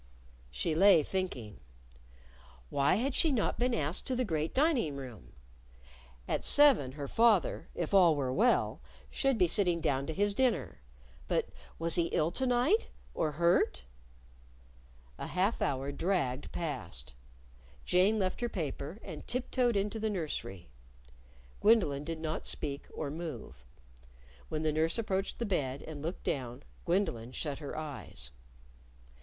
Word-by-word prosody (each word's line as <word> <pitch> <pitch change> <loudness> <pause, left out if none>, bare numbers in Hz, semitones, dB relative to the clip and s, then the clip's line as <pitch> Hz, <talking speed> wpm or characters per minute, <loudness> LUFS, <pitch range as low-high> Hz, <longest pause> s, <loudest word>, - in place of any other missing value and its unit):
She 65 - -1
lay 180 -1 +6
thinking. 135 - -4 1.1
Why 140 +4 +3
had 255 +6 0
she 320 - +3
not 235 -7 0
been 245 0 +2
asked 155 -2 0
to 260 - 0
the 250 0 0
great 160 -4 -1
dining 265 - +2
room? 125 - -9 0.9
At - - -1
seven 275 - +5
her 140 -1 -5
father 225 - +2
if 170 +2 -3
all 175 -5 +6
were 130 -3 -1
well 240 - +2 0.3
should 270 -3 +1
be 180 -4 +4
sitting 175 -1 +2
down 140 -4 0
to 160 - -2
his 205 0 +2
dinner. 255 - 0 0.5
But - - 0 0.3
was 165 0 +2
he 170 -2 +3
ill 160 0 +1
to 260 +6 0
night? 250 - +3 0.3
or 155 -2 -1
hurt? 170 - +2 1.4
A - - -4
half 190 +5 0
hour 135 +1 -1
dragged 140 -5 -1
past. 110 - -5 0.7
Jane 190 +5 +3
left 190 0 -1
her 240 - 0
paper 155 - -4
and 160 -6 -8
tiptoed 250 -1 0
into 205 +2 -1
the 220 0 0
nursery. 150 - -4 0.9
Gwendolyn 185 -11 +3
did 165 +1 -4
not 160 0 -3
speak 140 -1 -2
or 145 -3 -4
move. 135 - -7 0.8
When 155 0 -2
the 155 -1 +1
nurse 160 +4 +1
approached 195 -3 -1
the 235 - -2
bed 140 - -1
and 155 -2 -8
looked 165 +5 -5
down, 125 -1 -3 0.2
Gwendolyn 165 - 0
shut 145 -1 -4
her 145 -3 -6
eyes. 145 - -7
165 Hz, 145 wpm, -32 LUFS, 140-205 Hz, 1.4 s, lay